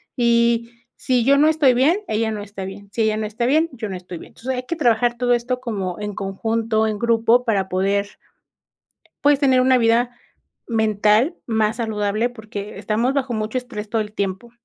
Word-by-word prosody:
y 235 -1 +2 0.2
si 250 -3 0
yo 280 +1 +5
no 300 +2 +5
estoy 305 -5 +4
bien, 295 +11 +3
ella 220 +1 0
no 210 -1 -4
está 200 -2 -7
bien, 200 +1 -9
si 230 - -2
ella 215 0 +1
no 215 - -2
está 220 +3 -3
bien, 310 +6 +2
yo 220 -4 -5
no 190 - -4
estoy 180 -1 -9
bien. - - -13
Entonces, 260 +2 -4
hay 250 - -4
que 335 - -4
trabajar 240 -4 +2
todo 245 0 +2
esto 245 +1 -1
como 200 -7 -4
en 210 0 -4
conjunto, 220 +3 -1
en 210 -1 -3
grupo, 235 +1 +3
para 200 -5 +1
poder 195 +2 0 1.2
pues, 290 -1 +4
tener 265 -3 +4
una 255 0 +4
vida 235 +1 +2 0.6
mental 220 - +2
más 220 -1 0
saludable, 215 0 -1
porque 215 -3 -8
estamos 220 +5 0
bajo 265 -3 -1
mucho 215 +2 -2
estrés 225 -4 -6
todo 225 0 0
el 210 0 -7
tiempo. 200 +3 -3
225 Hz, 195 wpm, -21 LUFS, 210-245 Hz, 1.2 s, yo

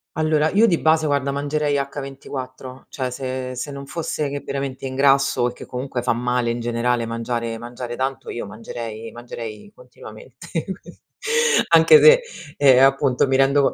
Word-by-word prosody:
Allora 155 0 +2
io 215 +3 +4
di 175 -7 +2
base, 160 0 +3
guarda, 140 -1 0
mangerei 145 +1 -1
h 140 0 -1
24 130 -1 -8
cioè, 130 -4 -4
se 130 0 -4
se 135 +4 -5
non 140 0 -8
fosse 155 -1 -3
che 145 - -4
veramente 135 -1 -4
ingrasso 135 -1 +2
e - - -10
che, - - -11
comunque, 125 0 -4
fa 125 - +1
male, 125 0 -1
in 120 - -2
generale, 120 0 0
mangiare 115 0 -3
mangiare 120 +1 -7
tanto, 130 +1 -3
io 115 -4 -5
mangerei 115 +1 -7
mangerei 120 - -9
continuamente, - - -13 0.3
qui - - -15 0.7
anche 465 -1 +7
se 485 +2 +8 0.4
ehm, 135 -2 +6
appunto, 135 -1 +2
mi 135 - +1
rendo 135 +1 +3
130 Hz, 160 wpm, -21 LUFS, 120-140 Hz, 0.7 s, se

